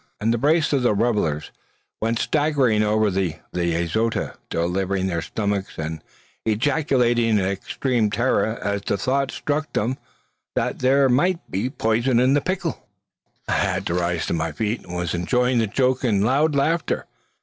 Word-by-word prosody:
And 115 +2 +1
the 120 - -1
brace 155 +4 +2
of 135 -3 +2
revellers 105 -9 +1 0.5
went 115 +1 0
staggering 140 -7 +2
over 105 0 +2
the 90 -4 -1 0.2
azotea, 85 +6 0 0.2
delivering 95 +3 -1
their 85 -3 -1
stomachs, 100 +1 -3
and 80 0 -4 0.4
ejaculating 120 -1 +2
in - - +3
extreme 110 +4 -1
terror 115 0 +1
as 100 0 -1
the 100 - -1
thought 135 +6 0
struck 150 +1 -2
them 125 +5 -1 0.6
that - - -1
there 135 +2 +4
might 165 +8 +1
be 100 +7 -1
poison 120 -1 +1
in 130 +2 +4
the 145 - +3
pickle. 185 +3 -3 0.6
I - - -2
had 95 -2 0
risen 85 -1 0
to - - 0
my 80 -2 -1
feet, 110 0 -3
and 90 - -6
was 90 -2 -2
enjoying 125 +8 +1
the 110 - +1
joke 130 +4 +1
in 105 -6 +2
loud 140 +6 +2
laughter. 160 +3 0
115 Hz, 155 wpm, -23 LUFS, 95-130 Hz, 0.6 s, there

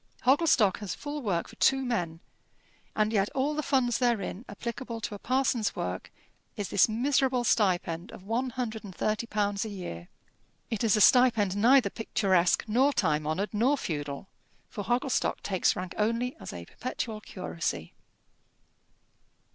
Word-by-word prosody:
Hogglestock 260 - +4
has 205 -3 -5
full 295 0 -5
work 185 -8 -1
for - - -14
two 270 0 +3
men; 175 -9 -2 0.7
and 215 +1 +1
yet 200 -1 +2
all 275 +3 +1
the 305 - -1
funds 250 -5 +1
therein 235 -3 -1
applicable 235 +2 -5
to 205 -1 -5
parson's 255 -3 0
work 90 +1 -4 0.5
is 205 - -3
this 200 - +4
miserable 255 +2 +1
stipend 180 -4 +1
of - - -11
one 235 +6 -1
hundred 230 -3 -4
and 190 -3 -10
thirty 215 +2 -1
pounds 205 -2 0
a 220 - -5
year. 130 - -7 0.6
It 225 -1 -1
is 220 -1 +3
a - - +2
stipend 225 -6 +5
neither 245 +5 +5
picturesque, 190 -5 +2
nor 260 +6 +3
time 155 - +1
honoured, 190 +8 -2
nor 250 +7 +2
feudal, 145 - -4 0.4
for 210 -4 -5
Hogglestock 245 +5 0
takes 190 -3 +1
rank 180 0 -5
only 230 +4 0
as - - -7
a 85 -1 -8
perpetual 225 - -5
curacy. 165 - -4
215 Hz, 150 wpm, -28 LUFS, 190-250 Hz, 0.7 s, stipend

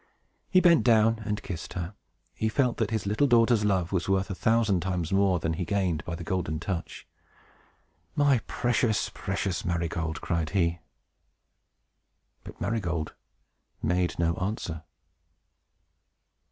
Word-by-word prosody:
He 185 - +5
bent 170 -3 +5
down 115 -1 +4
and 105 -1 -2
kissed 85 -3 -6
her. 90 +2 -4 0.4
He 110 - -1
felt 125 0 +1
that - - 0
his 110 -3 -2
little 105 +8 +2
daughter's 115 -3 +4
love 95 -4 +1
was 95 -1 -1
worth 95 0 +1
a - - -1
thousand 110 -1 +2
times 90 -2 -2
more 95 -2 +3
than 80 0 -1
he - - -6
had 90 - -2
gained 95 -6 0
by 85 - -4
the 85 - -7
Golden 80 -3 -2
Touch. 85 +1 -5 1.1
"My 140 -3 +4
precious, 115 -3 0
precious 95 -2 -2
Marygold!" 85 -2 -2
cried 85 -3 -1
he. 85 -1 +1 1.6
But - - -11
Marygold 85 -7 -2 0.7
made 90 0 +1
no 85 -1 +2
answer. 90 -4 -3
95 Hz, 140 wpm, -27 LUFS, 85-110 Hz, 1.6 s, He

